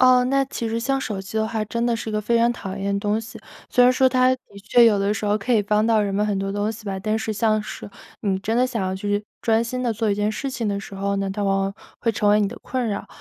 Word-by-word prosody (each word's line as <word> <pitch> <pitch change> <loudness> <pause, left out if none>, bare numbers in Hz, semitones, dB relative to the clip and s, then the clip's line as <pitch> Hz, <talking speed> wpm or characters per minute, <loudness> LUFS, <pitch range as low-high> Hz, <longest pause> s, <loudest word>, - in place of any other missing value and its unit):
哦， 255 -1 +6
那 275 +1 +2
其 235 -3 -4
实 225 +1 -1
像 270 +3 0
手 205 -6 -4
机 210 +3 -4
的 220 0 0
话， 220 -2 -2
真 235 +3 -2
的 235 -1 +1
是 220 - -5
一 - - -6
个 215 - 0
非 235 +3 +1
常 235 +1 +3
讨 195 -4 -6
厌 200 0 -2
的 200 - 0
东 210 +1 0
西， 225 0 -9 0.3
虽 250 - +4
然 250 - +7
说 255 +1 +3
它 255 0 +3
的 255 - -13 0.2
确 235 +3 +5
有 210 -3 +5
的 200 +1 +1
时 215 - -4
候 210 +1 +2
可 245 +5 -1
以 210 - +3
帮 210 +2 +2
到 220 -2 +3
人 200 -1 -2
们 210 +1 +1
很 205 -2 0
多 195 0 -2
东 205 +2 -1
西 220 0 -9
吧， 195 -1 -3
但 215 +2 0
是 220 0 -2
像 215 0 +1
是 205 - -8 0.3
你 195 -2 0
真 220 +3 -1
的 250 +1 +4
想 235 -6 -3
要 185 0 -1
去 205 +2 -2 0.2
专 225 0 +2
心 250 +2 -3
地 245 - +1
做 220 -1 0
一 - - +2
件 210 +1 0
事 270 +5 -4
情 235 -4 -2
的 200 -1 -1
时 200 0 -9
候 200 +1 -1
呢， 195 0 -1
它 205 +2 -3
往 195 -1 +2
往 195 +1 -2 0.2
会 230 - 0
成 205 0 +1
为 205 +1 +5
你 200 - +2
的 235 +4 -7
困 255 -2 -2
扰。 205 - -3
215 Hz, 335 characters per minute, -23 LUFS, 200-235 Hz, 0.3 s, 然